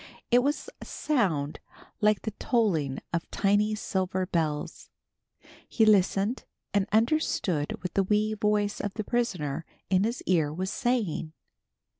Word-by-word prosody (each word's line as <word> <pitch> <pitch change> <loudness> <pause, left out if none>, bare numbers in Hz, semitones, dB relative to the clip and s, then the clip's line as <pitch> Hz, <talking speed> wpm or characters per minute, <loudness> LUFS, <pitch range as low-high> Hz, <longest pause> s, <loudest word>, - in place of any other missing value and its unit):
It 245 +1 +6
was 285 +3 -1
a - - -7
sound 175 - 0 0.4
like 210 -1 +3
the 220 - -2
tolling 165 - +1
of 170 -1 -2
tiny 205 +2 +2
silver 185 -3 -1
bells. 160 -5 -2 0.8
He 225 - +3
listened 205 +2 +3 0.3
and 200 -1 +2
understood 220 - +1
what 180 - -4
the 195 - +3
wee 210 +2 +1
voice 210 -1 0
of 205 - -4
the 215 - -2
prisoner 180 - -1 0.3
in 185 0 +4
his 230 +3 -2
ear 160 -5 +2
was 185 +5 -3
saying. 220 - -1
200 Hz, 135 wpm, -28 LUFS, 170-220 Hz, 0.8 s, It